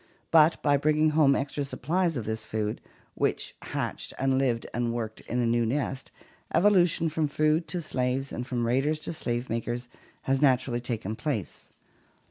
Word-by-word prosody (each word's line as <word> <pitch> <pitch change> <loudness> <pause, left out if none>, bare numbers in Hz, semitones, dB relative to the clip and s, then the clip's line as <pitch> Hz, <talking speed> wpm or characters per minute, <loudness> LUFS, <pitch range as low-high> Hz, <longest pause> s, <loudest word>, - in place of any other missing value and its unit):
But 160 0 +6
by 145 -1 +4
bringing 155 +2 +3
home 150 -3 +4
extra 140 +1 -2
supplies 165 +4 -1
of 115 - -4
this 110 0 -2
food, 110 -1 -3 0.3
which - - -1
hatched - - -4
and 135 0 +2
lived 120 -4 0
and 120 0 0
worked 110 -2 -4
in 125 - -1
the 120 - +2
new 120 0 +2
nest, 135 +2 -2 0.5
evolution 175 -3 +4
from 155 -1 0
food 155 +3 +1
to 175 -2 -3
slaves 130 0 -1
and 125 +1 -5
from 120 -2 -1
raiders 135 +6 +1
to 160 - -4
slave 120 -4 -2
makers 120 +2 -3 0.3
has 135 +1 +1
naturally 130 -3 +2
taken 110 -3 -3
place. 115 - -4
135 Hz, 165 wpm, -27 LUFS, 120-155 Hz, 0.5 s, But